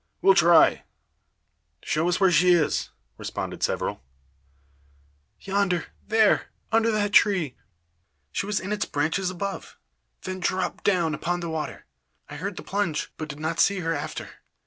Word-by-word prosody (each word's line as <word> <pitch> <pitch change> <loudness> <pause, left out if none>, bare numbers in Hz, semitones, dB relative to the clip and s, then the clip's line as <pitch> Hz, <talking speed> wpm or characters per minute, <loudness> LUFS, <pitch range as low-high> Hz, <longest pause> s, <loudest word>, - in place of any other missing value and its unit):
"We'll 195 - +7
try; 170 -3 +5 1.0
show 160 +3 0
us 180 - 0
where 190 -2 +4
she 180 +2 +5
is," 165 -4 +1 0.3
respond - - -5
several. - - -1 1.4
"Yonder 195 -3 0 0.2
there 220 -1 +3 0.2
under 225 0 +3
that 210 -2 0
tree. 180 -10 +4 0.8
She 195 - -2
was 210 -1 0
in 195 - -6
its 210 - -1
branches 165 +6 -1
above, 195 +2 -5 0.5
then 185 0 -5
dropped 185 +1 -2
down 175 -5 +2
upon 175 +3 -2
the 170 -1 -4
water. 160 -1 -5 0.4
I 145 - -8
heard 195 +5 -4
the - - -6
plunge, 195 -6 -2
but 155 -1 -6
did 145 0 -7
not 160 +2 -2
see 200 -1 +3
her 165 -1 -1
after. - - -5
180 Hz, 145 wpm, -25 LUFS, 165-200 Hz, 1.4 s, We'll